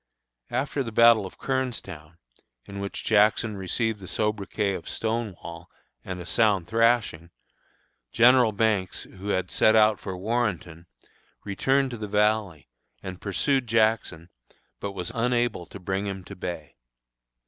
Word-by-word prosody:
After 140 +1 -1
the 115 -3 -4
battle 115 -2 +5
of - - -15
Kernstown, 100 - -4 0.5
in 100 0 -8
which 100 0 -5
Jackson 110 0 +3
received 105 +3 -2
the 95 - -10
sobriquet 105 -1 -1
of - - -6
"Stonewall" 105 -7 -4 0.3
and 90 -1 -6
a 90 - -7
sound 100 0 +2
thrashing, 115 -6 +1 0.8
General 120 -1 +5
Banks, 100 -3 0
who 95 +1 -11
had 95 -3 -1
set 110 - +4
out 110 -1 +5
for 95 -2 -6
Warrenton, 95 -6 -2 0.6
returned 135 +6 +1
to 120 - -5
the 105 -1 -5
Valley, 105 - 0 0.4
and 95 -1 -7
pursued 130 +5 0
Jackson, 110 -7 +1 0.5
but 100 -1 -5
was 90 -3 -5
unable 120 -6 0
to 100 - -10
bring 95 +2 -2
him 95 -1 -5
to - - -10
bay. 85 -5 -7
105 Hz, 135 wpm, -26 LUFS, 95-115 Hz, 0.8 s, battle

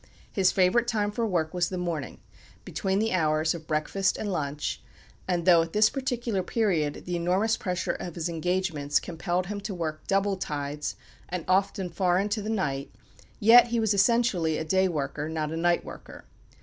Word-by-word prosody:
His 190 -3 +3
favourite 195 +6 +3
time 210 -3 0
for 230 +2 -1
work 165 -5 -1
was 180 -1 0
the 185 - -4
morning, 170 -5 -3 0.5
between 190 0 -1
the 220 +1 0
hours 155 -2 +2
of 160 -2 -9
breakfast 165 +5 0
and 205 - -3
lunch; 145 -2 -3 0.5
and 175 -2 0
though, 175 -3 +7
at 165 0 -4
this 215 +1 +4
particular 240 -6 -2
period, 180 -8 0
the 180 - -2
enormous 185 +6 +1
pressure 180 -4 -2
of 175 - -6
his 170 -1 -2
engagements 170 -4 0
compelled 175 +1 -2
him 200 +2 -5
to 200 -1 -5
work 155 -3 -4
"double 195 0 +1
tides," 145 -3 -4 0.3
and 175 -2 -4
often 190 0 +1
far 180 0 +2
into 205 +3 0
the 210 - -5
night, 140 -11 -1 0.5
yet 235 +3 +8
he 235 0 0
was 220 -2 +2
essentially 195 -6 +2
a - - -2
day 190 +3 +3
worker, 150 -2 -3
not 155 -1 -2
a - - -3
night 175 +1 +1
worker. - - -11
180 Hz, 180 wpm, -27 LUFS, 160-205 Hz, 0.5 s, yet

